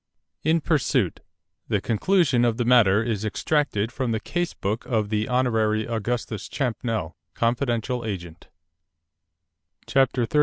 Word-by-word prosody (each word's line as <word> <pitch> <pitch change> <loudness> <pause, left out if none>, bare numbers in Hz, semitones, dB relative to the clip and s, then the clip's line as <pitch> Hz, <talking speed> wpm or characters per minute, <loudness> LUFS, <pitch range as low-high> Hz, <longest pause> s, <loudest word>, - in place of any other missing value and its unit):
In 160 +2 +2
Pursuit 150 -3 +1 0.5
The - - +1
Conclusion 140 - +2
of 115 -2 +2
the 120 - 0
Matter 115 -4 +5
is 110 -3 -2
extracted 115 -1 0
from 130 -1 -2
the 110 - 0
Case 175 +9 -3
Book 105 +4 -2
of 110 -4 0
the 110 0 0
Hon. 125 +1 +2 0.4
Augustus 115 -2 -3
Champnell, 115 - -2 0.2
Confidential 120 0 0
Agent 90 -6 -6 1.4
CHAPTER 135 -2 +2
XXXII. 150 - +1
120 Hz, 125 wpm, -24 LUFS, 110-130 Hz, 1.4 s, Matter